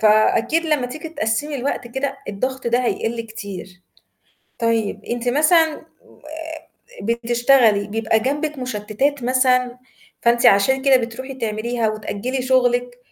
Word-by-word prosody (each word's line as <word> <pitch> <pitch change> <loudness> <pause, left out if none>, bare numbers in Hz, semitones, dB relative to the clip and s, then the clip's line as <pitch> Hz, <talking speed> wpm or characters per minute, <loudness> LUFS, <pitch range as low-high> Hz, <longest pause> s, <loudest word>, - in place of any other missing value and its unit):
فأكيد 225 +8 +3
لمّا 295 -5 +1
تيجي 305 +6 -7
تقسّمي 290 +1 -2
الوقت 255 -2 -3
كده 275 +2 -3
الضغط 255 +6 -3
ده 235 +1 +2
هيقِلّ 230 0 -1
كتير. 200 -5 -8 0.8
طيب 230 -2 -1
أنتِ 240 +1 -3
مثلًا 315 +4 +4
آآ، 320 +11 -12
بتشتغلي 235 -1 +3
بيبقى 220 +1 +1
جنبِك 290 +4 -2
مشتتات 250 +3 -2
مثلًا 250 0 +2 0.4
فأنتِ 240 +1 +4
عشان 240 +6 +4
كده 270 -1 +6
بتروحي 255 +3 -5
تعمليها؟ 230 0 -2
وتأجّلي 215 +4 -3
شغلِك 245 -1 +1
245 Hz, 120 wpm, -21 LUFS, 225-270 Hz, 0.8 s, كده